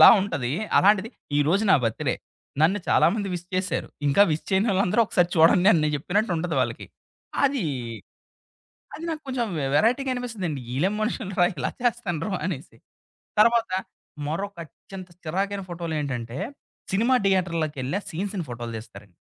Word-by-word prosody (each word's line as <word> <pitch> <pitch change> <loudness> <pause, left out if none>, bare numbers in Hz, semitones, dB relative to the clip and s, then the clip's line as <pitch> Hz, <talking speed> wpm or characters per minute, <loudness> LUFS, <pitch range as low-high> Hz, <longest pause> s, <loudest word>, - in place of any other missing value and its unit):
అదోలా - - +12
ఉంటది. 155 -11 -2 0.3
అలాంటిది 205 +2 +4 0.3
ఈరోజు 170 +9 +2
నా - - +8
బర్త్‌డే. 115 -1 0 0.5
నన్ను 175 +6 +4
చాలామంది 205 -2 +3
విష్ 175 0 -5
చేసారు. 185 +1 -1 0.2
ఇంకా 145 +9 +5
విష్ 155 - -1
చేయనోళ్ళందరూ 195 +1 +2
ఒకసారి 180 -4 +2
చూడండి 170 +4 +6
అని 165 - +3
నేను 150 - +1
చెప్పినట్టు 200 +8 0
ఉంటది 165 -1 -2
వాళ్ళకి. 120 -2 -2 0.6
అది, 275 -7 +1 1.3
అది 325 - -7
నాకు 315 -1 -4
కొంచెం 250 -3 -1
వె 135 - -1
వెరైటీగా 250 - +2
అనిపిస్తదండి. 205 - -3
ఈళ్ళేం 185 +9 +1
మనుషులు 215 -2 -2
రా! 175 - +7
ఇలా 135 - -2
ఇలా - - -4
చేస్తన్న్రు 215 -7 -1 0.2
అనేసి. 155 -6 -5 0.6
తర్వాత 230 -1 +4 0.6
మరొక 200 +5 -3
అత్యంత 185 +5 -11 0.2
చిరాకైన 195 +4 -1
ఫోటోలేంటంటే, 145 -8 -3 0.5
సినిమా 230 +6 +3
థియేటర్‌లోకెళ్లి 165 -5 0
ఆ - - -17
సీన్స్‌ని 190 +1 -3
ఫోటోలు 120 -1 -5
తీస్తారండి. 105 -4 -13
185 Hz, 140 wpm, -25 LUFS, 155-210 Hz, 1.3 s, అదోలా